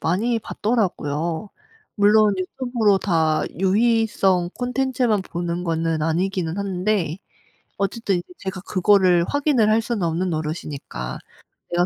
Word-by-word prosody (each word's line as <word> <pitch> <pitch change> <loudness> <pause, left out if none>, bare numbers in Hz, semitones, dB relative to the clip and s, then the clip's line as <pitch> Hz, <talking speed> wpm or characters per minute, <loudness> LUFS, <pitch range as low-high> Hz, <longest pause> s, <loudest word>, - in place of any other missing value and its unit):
많이 225 +8 0
봤더라고요. 175 -6 -2 0.4
물론 210 0 +4
유튜브로 215 +1 +1
다 160 -5 +1 0.2
유희성 195 -3 +2
콘텐츠만 250 -4 0
보는 175 -1 -4
거는 165 -2 -1
아니기는 175 +2 -1
한데 190 -3 -1 0.6
어쨌든 200 0 -1
이제 175 - -8
제가 190 -1 -5
그거를 185 -2 +3
확인을 280 - +2
할 220 +1 +3
수는 220 -5 -2
없는 170 +3 0
노릇이니까 150 - -5 0.5
내가 175 0 +2
190 Hz, 285 characters per minute, -22 LUFS, 170-215 Hz, 0.6 s, 물론